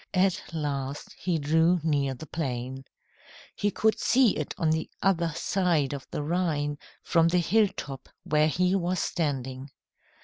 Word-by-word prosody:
At 190 Hz, 0 st, +3 dB
last, 145 Hz, -3 st, -3 dB
he 175 Hz, -3 st, -1 dB
drew 160 Hz, +4 st, +3 dB
near 140 Hz, -4 st, +1 dB
the 145 Hz, -, -9 dB
plain. 130 Hz, -3 st, -4 dB, 0.7 s
He 205 Hz, -, +1 dB
could 220 Hz, +2 st, +1 dB
see 250 Hz, -2 st, +4 dB
it -, -, -4 dB
on 165 Hz, -4 st, +1 dB
the 160 Hz, 0 st, -1 dB
other 170 Hz, -4 st, +2 dB
side 170 Hz, -9 st, +1 dB
of 140 Hz, -2 st, -7 dB
the 150 Hz, -, -3 dB
Rhine, 150 Hz, -3 st, -1 dB, 0.2 s
from 165 Hz, -1 st, +3 dB
the 175 Hz, +2 st, +2 dB
hilltop 180 Hz, -6 st, 0 dB
where 150 Hz, 0 st, +3 dB
he 180 Hz, +3 st, +1 dB
was 185 Hz, -1 st, 0 dB
standing. 135 Hz, -4 st, -2 dB
160 Hz, 145 wpm, -27 LUFS, 145-180 Hz, 0.7 s, see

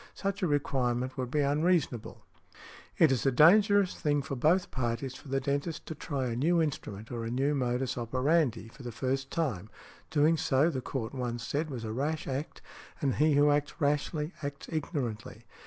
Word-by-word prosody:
Such 195 Hz, 0 st, -3 dB
a 180 Hz, -, +2 dB
requirement 130 Hz, -4 st, 0 dB
would 130 Hz, -2 st, -3 dB
be 150 Hz, +3 st, +1 dB
unreasonable". 145 Hz, -4 st, 0 dB, 0.7 s
It 160 Hz, -4 st, +5 dB
is 130 Hz, -, +1 dB
a -, -, +4 dB
dangerous 200 Hz, -, +5 dB
thing 145 Hz, -2 st, 0 dB
for 140 Hz, -, -4 dB
both 165 Hz, +8 st, +2 dB
parties 125 Hz, +1 st, -2 dB
for 140 Hz, -, -12 dB
the 135 Hz, 0 st, 0 dB
dentist 140 Hz, +4 st, -2 dB
to -, -, -5 dB
try 140 Hz, -3 st, -3 dB
a 120 Hz, -2 st, -2 dB
new 165 Hz, +8 st, +2 dB
instrument 115 Hz, -9 st, -3 dB
or 120 Hz, -1 st, -3 dB
a 115 Hz, -, -3 dB
new 135 Hz, +5 st, +1 dB
modus 130 Hz, -1 st, -1 dB
operandi 130 Hz, 0 st, +1 dB
for 115 Hz, -, -14 dB
the 120 Hz, -1 st, -6 dB
first 135 Hz, +3 st, -2 dB
time—doing 150 Hz, -, -1 dB
so 145 Hz, +3 st, +2 dB
the 130 Hz, -4 st, -3 dB
Court 125 Hz, -2 st, -4 dB
once 120 Hz, -3 st, -3 dB
said 155 Hz, +5 st, -2 dB
was 125 Hz, -5 st, -5 dB
a 110 Hz, -1 st, -4 dB
rash 150 Hz, +6 st, -2 dB
act, 135 Hz, +3 st, -5 dB, 0.4 s
and 140 Hz, -5 st, 0 dB
he 150 Hz, 0 st, +4 dB
who 145 Hz, +1 st, +5 dB
acts 145 Hz, 0 st, -1 dB
rashly 150 Hz, +2 st, 0 dB
acts 140 Hz, -1 st, -6 dB
ignorantly. 140 Hz, -8 st, -4 dB
140 Hz, 180 wpm, -30 LUFS, 125-155 Hz, 0.7 s, It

